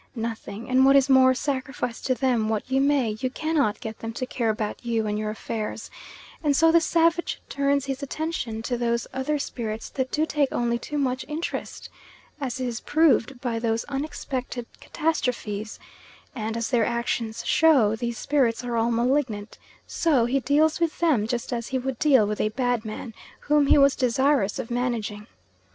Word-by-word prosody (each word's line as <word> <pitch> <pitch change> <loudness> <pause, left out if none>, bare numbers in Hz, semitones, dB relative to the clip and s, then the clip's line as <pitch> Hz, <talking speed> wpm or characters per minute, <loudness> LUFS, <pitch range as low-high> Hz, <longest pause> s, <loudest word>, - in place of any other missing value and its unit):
Nothing; 225 -1 -5
and 255 +1 +4
what 275 +1 +6
is 275 0 +4
more, 260 0 +6
sacrifice 265 -3 -3
to 255 - 0
them 245 -5 +1
what 220 +3 -2
you 265 +1 +3
may, 275 -5 +2
you 255 - -1
cannot 285 -7 0
get 220 -1 -7
them 225 0 -5
to 255 - -3
care 235 -2 -1
about 215 +1 -3
you 230 -2 0
and 210 0 -1
your 215 0 -2
affairs, 215 0 -5 0.5
and 290 -2 +2
so 325 0 +5
the 335 0 +5
savage 335 +1 +1
turns 280 0 +1
his 270 0 -4
attention 280 -6 -3
to 245 0 -2
those 235 0 0
other 265 +3 -1
spirits 225 -5 -4
that 260 -1 -2
do 310 +3 +1
take 295 -3 +1
only 235 0 0
too 295 +5 -5
much 260 -2 0
interest, 310 +3 -5 0.5
as 260 -3 -3
is 245 -2 -2
proved 290 -5 +2
by 235 -3 -2
those 225 0 0
unexpected 270 -3 -4
catastrophes; 235 -9 -2 0.6
and, 225 -2 -3
as 230 - -2
their 240 -3 +3
actions 235 -1 -2
show, 270 -10 +4
these 235 0 -3
spirits 250 -5 +1
are 240 -1 -3
all 230 +1 +2
malignant, 235 -3 0 0.3
so 285 -8 +2
he 260 +3 +1
deals 295 +5 +2
with 335 -2 0
them 290 -11 +2
just 240 +1 -3
as 235 -1 -3
he 265 - -1
would 255 -1 -4
deal 270 -8 +5
with 210 0 -2
a 215 - +1
bad 245 0 -1
man 220 +1 -7 0.3
whom 295 -1 +3
he - - +6
was 275 -1 +5
desirous 260 -3 +2
of 255 -3 -5
managing. 230 -4 -2
250 Hz, 180 wpm, -25 LUFS, 230-280 Hz, 0.6 s, what